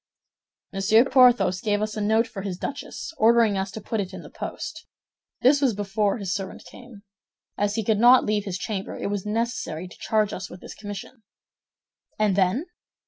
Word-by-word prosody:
"Monsieur 215 +5 +4
Porthos 245 -8 +4
gave 205 -1 +1
us 215 0 -3
a 215 - -3
note 220 +2 +3
for 225 -3 -7
his 190 -2 -4
duchess, 285 - -6
ordering 225 -1 +5
us 190 0 -2
to 200 - -7
put 220 +1 -3
it 190 -2 -4
in - - -9
the - - -12
post. 315 -1 -7 0.6
This 275 +3 +5
was 255 -6 +2
before 205 +1 0
his 195 -4 -3
servant 195 -1 -6
came. 240 -5 -13 0.5
As 205 0 0
he 225 - -1
could 210 0 +1
not 245 +2 +7
leave 210 -1 0
his 195 -2 -3
chamber, 195 0 -4
it 200 - -3
was 205 0 -3
necessary 210 -7 -2
to 180 - -14
charge 215 -2 +1
us 190 - -6
with 180 - -10
this - - -10
commission." 205 +3 -8 1.0
"And 210 -3 +2
then?" 195 - +1
210 Hz, 190 wpm, -25 LUFS, 195-230 Hz, 1.0 s, not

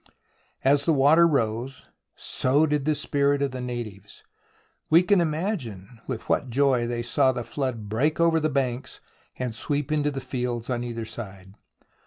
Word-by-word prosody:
As 140 +1 +3
the 165 - +3
water 155 +5 +6
rose, 125 -2 -1 0.3
so 140 +5 +1
did 150 -2 0
the 155 0 +2
spirits 140 0 +1
of 140 - -1
the 130 0 -5
natives. 110 -5 -7 0.7
We 165 +3 +6
can 200 -1 +4
imagine 145 - -3
with 125 -4 -5
what 135 - 0
joy 130 -1 +2
they 120 0 -2
saw 130 +2 +3
the 120 -2 -4
flood 125 -5 -3
break 135 +10 0
over 165 -1 +4
the 155 0 0
banks 130 -3 -2 0.4
and 125 -3 -3
sweep 145 +5 -2
into 150 -1 +1
the 135 -2 -4
fields 125 -2 -3
on 120 -1 -1
either 115 -2 -4
side. 100 -4 -9
130 Hz, 165 wpm, -25 LUFS, 120-145 Hz, 0.7 s, water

